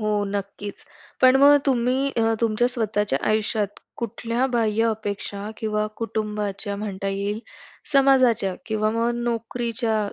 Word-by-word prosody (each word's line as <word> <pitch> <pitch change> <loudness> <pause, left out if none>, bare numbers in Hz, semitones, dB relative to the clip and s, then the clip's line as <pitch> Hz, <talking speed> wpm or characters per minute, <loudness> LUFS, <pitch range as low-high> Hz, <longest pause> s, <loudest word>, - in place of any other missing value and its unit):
हो, 215 - -1 0.2
नक्कीच. 200 0 -5 0.4
पण 255 0 +7
मग 290 +1 +8
तुम्ही 260 +1 +1
अ, 225 -1 +2
तुमच्या 230 +2 +2
स्वतःच्या 210 - 0
आयुष्यात 215 -1 0 0.2
कुठल्या 235 +2 -1
बाह्य 225 -1 +2
अपेक्षा 205 -1 -4
किंवा 215 -1 -1
कुटुंबाच्या 210 -2 -3
म्हणता 200 -2 -4
येईल, 200 +2 -2 0.5
समाजाच्या 255 -8 +4
किंवा 215 -1 0
मग 230 +1 +1
नोकरीच्या 230 -1 -1
220 Hz, 120 wpm, -24 LUFS, 205-235 Hz, 0.5 s, मग